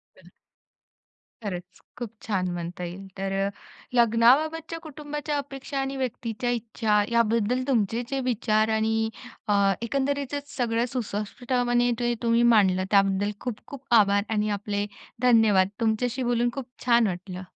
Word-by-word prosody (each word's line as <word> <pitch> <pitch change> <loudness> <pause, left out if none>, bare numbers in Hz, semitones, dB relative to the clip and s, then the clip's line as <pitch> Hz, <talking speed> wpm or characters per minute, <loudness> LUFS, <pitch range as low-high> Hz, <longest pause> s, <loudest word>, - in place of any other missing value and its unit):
तर, - - -18 1.1
खरंच 180 -3 -6 0.2
खूप 240 -3 -5 0.2
छान 190 -4 0
म्हणता 175 +1 -5
येईल. 180 +3 -7
तर 195 0 -2 0.6
लग्नाबाबतच्या 260 +8 +3
कुटुंबाच्या 295 -1 -4
अपेक्षा 275 -1 -5
आणि 270 0 -2
व्यक्तीच्या 245 -2 -3
इच्छा 220 -2 +1
याबद्दल 235 +1 +2
तुमचे 230 -2 +1
जे 275 - -1
विचार 220 -2 +1
आणि 220 0 +1 0.4
अ, 210 - +2 0.3
एकंदरीतचच 280 +3 -2
सगळं 235 -2 +1
सुस्पष्टपणे 245 +2 0
जे 240 0 +1
तुम्ही 235 0 +3
मांडलं, 185 -3 +3
त्याबद्दल 195 0 +3
खूप-खूप 250 +3 -7 0.2
आभार 200 -1 +3
आणि 215 -1 +1
आपले 205 0 -2 0.4
धन्यवाद. 220 -6 +5
तुमच्याशी 235 +3 0
बोलून 240 0 +1
खूप 270 -2 -5 0.2
छान 235 -2 +5
वाटलं. 185 0 -5
230 Hz, 125 wpm, -26 LUFS, 205-250 Hz, 1.1 s, धन्यवाद